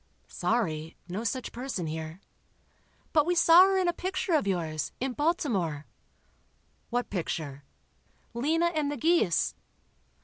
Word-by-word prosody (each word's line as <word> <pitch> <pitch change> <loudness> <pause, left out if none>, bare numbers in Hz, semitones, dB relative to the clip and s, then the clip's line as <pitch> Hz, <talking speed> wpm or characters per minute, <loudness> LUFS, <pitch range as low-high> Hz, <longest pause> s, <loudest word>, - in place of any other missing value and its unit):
"Sorry—no 175 -1 -2
such 255 +2 -2
person 245 -7 -4
here." 160 +3 -5 0.9
"But 305 -1 +4
we 355 - +2
saw 345 +2 +8
her 390 0 +2
in 370 -1 +2
a 345 - +2
picture 370 0 -2
of 300 -10 +2
yours, 160 -5 -2
in 265 0 -2
Baltimore." 220 - 0 1.0
"What 245 +1 -2
picture?" 155 -6 -4 0.7
"'Lena 320 +8 +1
and 300 -2 0
the 290 - -4
Geese. 285 - +2
240 Hz, 125 wpm, -28 LUFS, -, 1.0 s, saw